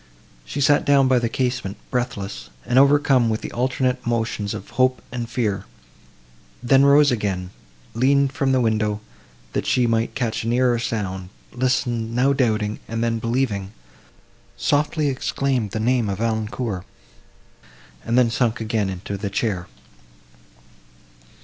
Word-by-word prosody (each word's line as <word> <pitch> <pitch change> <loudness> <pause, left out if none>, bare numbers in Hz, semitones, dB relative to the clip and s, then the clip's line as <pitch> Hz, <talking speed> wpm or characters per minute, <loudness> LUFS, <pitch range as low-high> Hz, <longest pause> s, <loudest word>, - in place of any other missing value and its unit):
She 100 - -4
sat 145 +1 +4
down 140 -2 +4
by 130 -1 +4
the 120 -1 -1
casement, 125 -5 -2
breathless, 105 - -3 0.2
and 125 - +3
overcome 140 -3 +4
with 110 0 -1
the - - -6
alternate 130 +1 0
emotions 115 -3 -2
of 100 - -9
hope 130 0 +2
and 120 -2 -4
fear; 110 -5 -1 1.0
then 135 +2 +5
rose 140 0 +6
again, 95 -5 -2 0.4
leaned 135 +3 +3
from 140 -3 0
the 130 -1 +3
window, 110 -2 0 0.5
that - - -2
she 125 - +3
might 115 0 0
catch 120 -5 -1
a - - -4
nearer 120 0 +2
sound, 95 -6 -3 0.2
listened, 120 -2 -1
now 135 +3 +3
doubting 110 -5 0
and 115 +1 -2
then 115 -1 0
believing, 110 -4 -1 0.8
softly 150 +1 +1
exclaimed 130 -3 -1
the 110 - -4
name 120 -1 +1
of 95 - -2
Valancourt, 110 -3 -2 1.2
and 115 - 0
then 120 -2 +4
sunk 120 -1 0
again 110 -3 -1
into 95 +2 -5
the 100 +1 -3
chair. 100 -3 -2
120 Hz, 140 wpm, -22 LUFS, 110-130 Hz, 1.2 s, rose